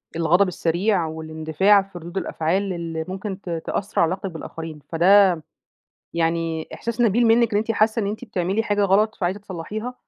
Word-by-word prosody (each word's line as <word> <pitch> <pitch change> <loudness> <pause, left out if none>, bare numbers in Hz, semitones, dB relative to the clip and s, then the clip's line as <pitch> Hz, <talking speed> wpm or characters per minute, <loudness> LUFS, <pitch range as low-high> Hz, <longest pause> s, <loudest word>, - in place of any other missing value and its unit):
الغضب 170 +4 +3
السريع 180 +2 0
والاندفاع 160 +5 +2
في 195 -2 -11
ردود 170 +3 -8
الأفعال، 190 +3 -1
اللي 165 -2 -4
ممكن 190 +1 -5
ت 180 - -8 0.2
تأثر 200 - -1
علي 170 - +4
علاقتِك 185 +2 -4
بالآخرين، 160 -1 -8
فده 190 +4 +6 0.8
يعني 165 -1 -1
إحساس 235 +1 -4
نبيل 235 +1 +3
منِك 230 0 +4
إن 205 - +3
أنتِ 225 +2 -1
حاسة 220 +1 +2
إن - - -1
أنتِ 215 +4 -4
بتعملي 195 -1 -1
حاجة 205 -2 0
غلط، 205 +3 +3
فعايزة 185 +2 -1
تصلحيها، 205 +6 -6
190 Hz, 165 wpm, -22 LUFS, 165-205 Hz, 0.8 s, فده